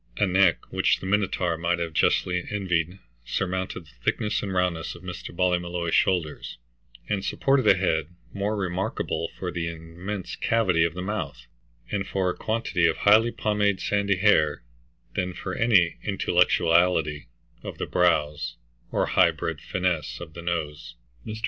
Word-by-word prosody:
A 105 - +3
neck 95 -2 +2
which - - +3
the - - -8
Minotaur 95 -4 0
might 85 +1 +1
have 85 -2 -3
justly 90 +2 +2
envied 90 -3 -1 0.3
surmounted 95 +6 -3
the 75 - -20
thickness 105 - 0
and 100 - -4
roundness 90 -3 -1
of 85 - -13
Mr. 90 -1 -7
Ballymolloy's 90 -1 -1
shoulders, 85 -6 0 0.5
and 100 -2 -1
supported 135 0 +1
a 95 - +6
head 80 -5 +1 0.3
more 100 +2 -1
remarkable 95 -3 -2
for 90 -2 -4
the 85 -1 -3
immense 85 +4 -6
cavity 95 -8 +2
of 85 0 -2
the 90 - -4
mouth, 105 +3 -4 0.5
and 100 -2 -1
for 95 -2 0
a - - -7
quantity 110 -6 0
of 80 - 0
highly 110 +3 +5
pomaded 105 -3 0
sandy 100 -1 +1
hair, 80 - +3 0.5
than 90 0 -2
for 95 - -5
any 100 -8 +3
intellectuality 85 - +2 0.3
of - - -7
the - - -2
brows 75 -4 +1 0.4
or - - +1
high - - +4
bred - - -4
fineness 85 -9 -2
of 80 -3 -9
the 85 - -8
nose. 75 -7 -4 0.3
Mr. 110 0 -5
90 Hz, 155 wpm, -25 LUFS, 85-100 Hz, 0.5 s, a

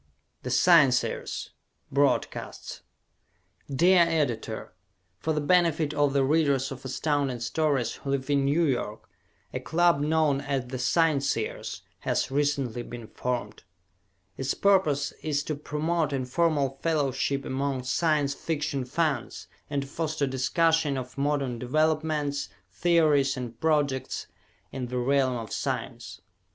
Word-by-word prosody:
"The 125 - -5
Scienceers" 135 -2 +3 0.4
Broadcasts 140 +1 -1 0.9
Dear 175 +6 +5
Editor: 140 -10 -1 0.5
For 160 - -1
the 150 -1 0
benefit 160 -1 +2
of 145 -2 +2
the 140 -1 +3
readers 140 -2 +2
of 135 -1 -8
Astounding 135 -1 -1
Stories 130 +1 0
who 140 - -7
live 135 -1 -1
in 140 -1 +3
New 150 +5 +2
York, 120 -6 -2 0.5
a - - -2
club 170 +3 +2
known 150 -2 +2
as 140 -3 -2
The 130 +1 -6
Scienceers 140 -4 0 0.2
has - - -1
recently 140 -4 0
been 120 -1 -8
formed. 120 -2 -4 0.8
Its 135 0 -1
purpose 155 -8 +2
is 145 -2 -1
to 155 - -3
promote 150 +2 -1
informal 135 +1 0
fellowship 140 -3 0
among 135 -1 -2
Science 145 +2 +1
Fiction 145 -3 -2
fans 140 -2 -1 0.2
and 140 -1 -1
to - - -9
foster 155 0 -2
discussion 145 +3 +1
of 130 0 -6
modern 140 -4 -1
developments, 155 +1 0 0.2
theories 150 -6 +3
and 120 -2 -6
projects 145 -5 0 0.5
in 130 -2 -4
the 125 +1 -4
realm 130 0 +2
of 115 -2 -6
science. - - -4
140 Hz, 125 wpm, -27 LUFS, 130-155 Hz, 0.9 s, Dear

